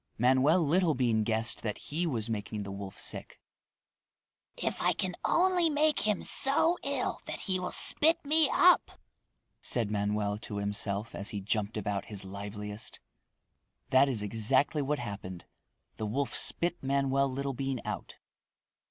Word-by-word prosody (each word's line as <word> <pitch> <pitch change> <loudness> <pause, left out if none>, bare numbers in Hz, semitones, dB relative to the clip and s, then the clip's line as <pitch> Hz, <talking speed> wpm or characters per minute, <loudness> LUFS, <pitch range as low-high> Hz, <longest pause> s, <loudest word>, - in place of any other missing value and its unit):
Manoel 130 +8 +4
Littlebean 140 -9 +2
guessed 110 +1 0
that 105 -2 -3
he 170 +4 -1
was 115 -7 -2
making 105 -1 -4
the 100 - -7
wolf 100 -1 -7
sick. - - -5 1.2
"If - - -2
I - - +3
can 185 -1 -2
only 355 -1 +3
make 305 0 +2
him 210 -3 0
so 310 +6 +2
ill 280 -2 -1
that - - -5
he 185 -2 -1
will 180 0 -4
spit 320 +3 +4
me 310 0 +4
up!" 360 0 +4 0.6
said 115 -4 +2
Manoel 105 0 -1
to 110 -1 -6
himself 100 +1 -2
as 100 - 0
he 105 - -3
jumped 105 +2 -2
about 100 -1 -2
his 100 -2 -6
liveliest. 105 +2 -6 0.9
That 135 +1 +5
is 115 -6 -1
exactly 130 +8 +2
what 145 +2 -1
happened. 95 -6 -7 0.5
The 110 - -3
wolf 135 +6 -2
spit 175 +1 -1
Manoel 135 0 +1
Littlebean 135 -1 -3
out. - - -5
125 Hz, 145 wpm, -30 LUFS, 105-165 Hz, 1.2 s, That